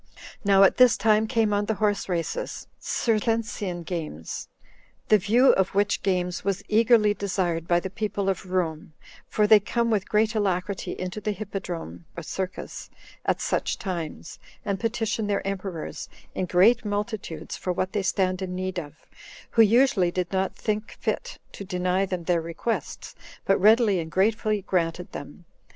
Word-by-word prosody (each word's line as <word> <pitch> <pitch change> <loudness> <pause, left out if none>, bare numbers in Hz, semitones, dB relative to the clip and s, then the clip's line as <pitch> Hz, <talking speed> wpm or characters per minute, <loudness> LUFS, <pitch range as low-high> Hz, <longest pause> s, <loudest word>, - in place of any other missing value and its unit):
4. - - -18 0.2
Now 195 -1 +6
at 195 - +5
this 250 -2 +6
time 215 +1 +3
came 220 -2 +1
on 205 0 +1
the 220 - -1
horse 205 -2 0
races 175 - -3
[Circensian 215 -5 -1
games]; 155 - -5 0.6
the 215 - +6
view 230 +7 +5
of 190 0 0
which 205 0 +2
games 180 -2 -1
was 195 -1 -1
eagerly 220 -1 +4
desired 180 -5 -2
by 175 0 +3
the 190 +1 -6
people 200 -1 -2
of 190 -1 -1
Rome, 165 -4 -2 0.3
for 210 - +2
they 215 0 +7
come 235 +3 -1
with 205 -3 0
great 220 +1 +2
alacrity 195 -2 -1
into 185 +3 -5
the 210 - -2
hippodrome 180 - -6
[circus] 185 +3 -5 0.4
at - - +2
such - - -1
times, 170 -4 -5 0.3
and 200 -2 -1
petition 225 -2 -1
their 200 -2 -1
emperors, 190 -4 -5 0.2
in 185 - -2
great 205 +8 +4
multitudes, 205 -6 -4
for 180 - -3
what 185 +1 -2
they 205 - +1
stand 185 -1 0
in 180 -1 -4
need 185 0 -2
of; 145 -2 -11 0.5
who 230 - +5
usually 225 -4 +4
did 180 0 -2
not 190 0 0
think 215 0 -3
fit - - -3
to - - -8
deny 185 0 0
them 180 -2 -3
their 170 -1 +1
requests, 170 +8 -4 0.3
but 195 - +3
readily 215 -2 +5
and 160 -1 -4
gratefully 210 +3 +1
granted 180 -2 -1
them. 145 +4 -9
195 Hz, 160 wpm, -25 LUFS, 180-215 Hz, 0.6 s, they